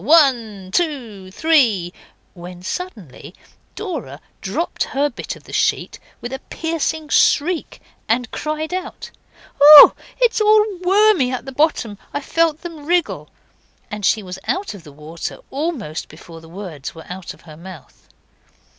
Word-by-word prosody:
One, 235 - +3
two, 235 - -2
three,' 220 - +2 0.4
when 180 0 -11
suddenly 195 - -7 0.4
Dora 290 - -6 0.2
dropped 265 - -2
her 285 +2 -1
bit 240 - -6
of - - -16
the - - -13
sheet - - 0 0.2
with 240 +2 -6
a 265 - -4
piercing 320 -1 -2
shriek 330 +4 +2 0.3
and 235 +1 0
cried 310 +2 -4
out 370 +1 -6 0.5
'Oh! 295 0 +11 0.3
it's 475 -3 +2
all 425 0 +5
wormy 375 -7 +3
at 255 - -4
the 270 - -7
bottom. 255 -8 0 0.2
I - - 0
felt 325 +1 0
them 325 -4 -9
wriggle.' 350 0 0 0.6
And 210 0 -6
she 215 +2 +2
was 185 0 -8
out 380 - -2
of 195 -5 -12
the 150 - -13
water 155 +4 -7
almost 270 - -4
before 165 +1 -13
the 160 - -15
words 170 -7 -8
were 160 - -11
out 180 0 -8
of - - -23
her 155 -3 -13
mouth. 170 -2 -13
255 Hz, 145 wpm, -19 LUFS, -, 0.6 s, Oh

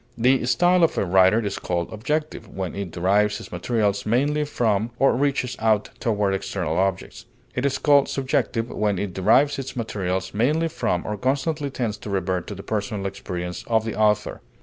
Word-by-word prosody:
The 125 +1 +3
style 175 +7 +4
of 165 - +2
a - - +1
writer 95 +4 +4
is 100 - -3
called 85 +1 -3
objective 150 +8 -3
when 95 -2 -5
it 100 -2 -4
derives 100 +5 +1
its - - -11
materials 105 -4 0
mainly 145 +7 +1
from 115 -6 0
or 135 - +3
reaches 135 -2 0
out 110 -2 +1
toward 105 -4 0
external 95 -4 -2
objects; 95 -1 -2 0.3
it 125 +3 0
is 135 - -1
called 145 -2 +4
subjective 125 -3 -1
when 105 -2 0
it 95 -1 -3
derives 135 +11 +3
its 135 0 -6
materials 95 -5 -3
mainly 150 +10 +1
from 90 - -1
or 105 - -3
constantly 140 +5 -1
tends 120 -6 -3
to 105 - -9
revert 95 -2 -1
to 105 - -6
the 100 - -9
personal 105 -2 -3
experience 90 -2 -5
of 110 -1 +2
the 110 - -3
author. 105 -1 +1
110 Hz, 180 wpm, -23 LUFS, 95-130 Hz, 0.3 s, style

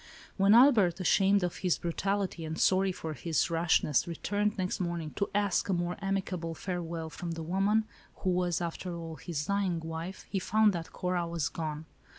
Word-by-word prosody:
When 200 +2 +5
Albert, 220 -9 +6
ashamed 195 +2 +3
of 175 - -2
his 180 -3 +1
brutality, 190 +1 -2
and 160 +1 -4
sorry 190 0 +3
for 160 -3 -5
his 165 +2 0
rashness, 165 -4 +2
returned 205 +5 -1
next 185 -1 -1
morning 170 -4 -3
to 200 - -2
ask 205 -2 +1
a - - +3
more 175 0 -1
amicable 185 -4 -2
farewell 170 -3 -4
from 170 +3 -5
the 165 0 -5
woman, 195 +6 +2 0.3
who 185 - -1
was, 180 -1 0
after 170 +1 -4
all, 165 -1 -7
his 150 -1 -4
dying 195 -3 0
wife, 165 +3 -6
he 195 - -1
found 215 +2 +3
that 165 -2 -5
Cora 180 -1 -1
was 170 -3 -1
gone. 155 -1 -4
175 Hz, 175 wpm, -30 LUFS, 165-195 Hz, 0.3 s, Albert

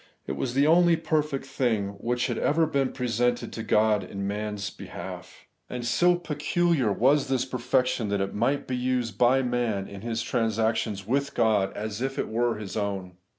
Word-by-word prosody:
It - - -4
was 125 -1 -3
tlie 140 +1 +4
only 170 +2 +5
perfect 150 -4 -1
thing 120 -7 0
which 120 +3 0
had - - -2
ever 160 +2 +3
been 140 -4 0
presented 125 -1 -1
to 115 - -4
God 105 -2 +2
in 100 +2 -5
man's 105 0 -3
behalf; - - -9 0.2
and 125 -1 -4
so 175 +9 +4
pecuUar 160 -5 0
was 135 +4 +3
this 130 -1 0
perfection, 125 -2 0
that 100 0 0
it 95 0 -2
might 125 +7 0
be 130 - -2
used 125 -4 -1
by 130 +2 +4
man 120 -5 -1
in 100 -1 -9
his 115 0 -2
transactions 110 -3 0
with 140 +5 -1
God, 105 -3 +2
as 105 +1 -4
if 135 +1 -2
it - - -2
were 120 +1 +1
his 105 -3 -7
own. 100 -3 -2
120 Hz, 180 wpm, -26 LUFS, 105-135 Hz, 0.2 s, only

